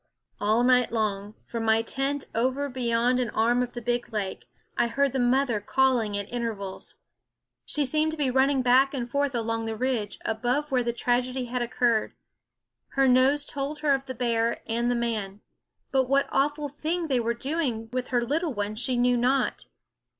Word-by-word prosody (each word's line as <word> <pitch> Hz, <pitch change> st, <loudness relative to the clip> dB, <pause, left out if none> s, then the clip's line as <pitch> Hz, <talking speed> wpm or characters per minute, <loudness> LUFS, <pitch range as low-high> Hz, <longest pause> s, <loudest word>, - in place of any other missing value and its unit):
All 215 Hz, +3 st, +2 dB
night 250 Hz, -1 st, +4 dB
long, 210 Hz, -2 st, -2 dB
from 230 Hz, -1 st, -4 dB
my 220 Hz, 0 st, +3 dB
tent 275 Hz, +4 st, -2 dB
over 260 Hz, +5 st, 0 dB
beyond 245 Hz, 0 st, +1 dB
an 245 Hz, -2 st, 0 dB
arm 240 Hz, +2 st, +2 dB
of 245 Hz, -1 st, -3 dB
the 240 Hz, -1 st, -7 dB
big 240 Hz, 0 st, -1 dB
lake, 205 Hz, -3 st, -4 dB, 0.3 s
I 235 Hz, -, +2 dB
heard 275 Hz, +3 st, +1 dB
the 265 Hz, -, 0 dB
mother 245 Hz, -2 st, +2 dB
calling 235 Hz, -2 st, +1 dB
at 200 Hz, -1 st, -4 dB
intervals. 220 Hz, -5 st, -4 dB, 0.7 s
She 295 Hz, -1 st, +2 dB
seemed 310 Hz, +4 st, +1 dB
to -, -, -6 dB
be 280 Hz, -4 st, +1 dB
run 265 Hz, +1 st, +4 dB
ning 275 Hz, -2 st, +1 dB
back 265 Hz, +3 st, +4 dB
and 240 Hz, -3 st, -3 dB
forth 280 Hz, +1 st, -1 dB
along 225 Hz, -1 st, -2 dB
the 225 Hz, -, -3 dB
ridge, 235 Hz, -3 st, -2 dB
above 250 Hz, +7 st, -1 dB
where 255 Hz, -2 st, +3 dB
the 240 Hz, 0 st, 0 dB
tragedy 250 Hz, +2 st, 0 dB
had 245 Hz, +1 st, -3 dB
occurred. 240 Hz, -2 st, 0 dB, 0.8 s
Her 270 Hz, 0 st, +3 dB
nose 265 Hz, +3 st, +4 dB
told 285 Hz, +2 st, -4 dB
her 295 Hz, -2 st, +3 dB
of 270 Hz, 0 st, -2 dB
the 260 Hz, -, -5 dB
bear 230 Hz, -1 st, 0 dB
and 235 Hz, +1 st, 0 dB
the 245 Hz, -, +1 dB
man; 215 Hz, -4 st, -3 dB, 0.5 s
but 265 Hz, -2 st, +2 dB
what 275 Hz, 0 st, +3 dB
awful 290 Hz, +2 st, +1 dB
thing 315 Hz, +5 st, -3 dB
they 260 Hz, -4 st, +1 dB
were 235 Hz, 0 st, -1 dB
doing 260 Hz, -4 st, -2 dB
with 255 Hz, 0 st, -2 dB
her 245 Hz, -1 st, +1 dB
little 300 Hz, +3 st, -1 dB
one 205 Hz, +1 st, -2 dB
she 245 Hz, +3 st, 0 dB
knew 245 Hz, 0 st, +3 dB
not. 255 Hz, +2 st, +1 dB
245 Hz, 185 wpm, -26 LUFS, 230-270 Hz, 0.8 s, night